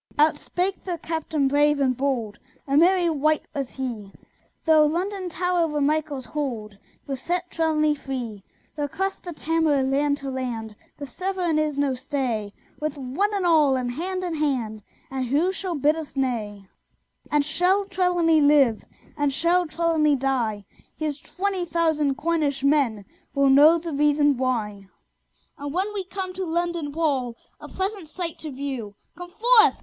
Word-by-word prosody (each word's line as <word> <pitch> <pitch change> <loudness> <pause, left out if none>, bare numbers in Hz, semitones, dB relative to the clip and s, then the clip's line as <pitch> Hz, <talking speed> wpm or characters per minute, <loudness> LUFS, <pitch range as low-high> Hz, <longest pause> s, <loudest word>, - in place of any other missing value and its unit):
Out 300 0 +4
spake 375 +2 -2
their 355 -2 -3
Captain 315 -3 -1
brave 290 +1 +3
and 260 -2 +2
bold: 240 -6 -2 0.3
A 275 - +1
merry 350 +3 +5
wight 310 -1 +1
was 275 -4 -3
he: 235 -7 -5 0.5
Though 315 -2 +6
London 370 +4 -2
Tower 355 0 +1
were 300 -1 -2
Michael's 290 -2 0
hold, 235 -9 -4 0.3
We'll 275 -1 -3
set 350 +6 -3
Trelawny 310 -2 +2
free! 250 -8 -5 0.3
We'll 295 -1 -2
cross 385 +6 -3
the 350 - -7
Tamar, 320 -3 +1
land 285 +2 +1
to 275 -1 -5
land: 235 -4 -4 0.2
The 285 - -6
Severn 360 +2 -1
is 305 -2 -1
no 285 -2 +1
stay: 255 -6 -2 0.3
With 305 -1 -3
"one 280 +11 -1
and 390 -3 0
all," 305 -5 +4
and 250 -1 -1
hand 370 +7 -3
in 350 -2 -2
hand; 255 -9 -1 0.3
And 260 -1 -2
who 305 +9 +2
shall 375 -2 -4
bid 295 +2 +3
us 320 -3 -7
nay? 220 -7 -2 0.6
And 295 -1 +2
shall 365 +6 +2
Trelawny 355 -4 +2
live? 285 -6 +4 0.4
Or 290 -1 +2
shall 340 +5 +1
Trelawny 310 -2 +2
die? 245 -6 -1 0.3
Here's 300 -2 -3
twenty 385 -1 -2
thousand 320 -5 +1
Cornish 300 -4 0
men 275 -8 +2 0.3
Will 275 -1 +4
know 300 +5 +7
the 335 -1 -5
reason 290 0 +3
why! 215 -6 -2 0.7
And 285 0 -4
when 380 +6 -1
we 395 -2 -3
come 375 0 -4
to 375 +1 -4
London 340 -3 -2
Wall, 280 -6 0 0.2
A - - -9
pleasant 385 -2 -3
sight 335 +1 -5
to 315 - -6
view, 260 -7 -5 0.2
Come 355 0 -9
forth! 450 +3 +5
295 Hz, 160 wpm, -24 LUFS, 270-340 Hz, 0.7 s, know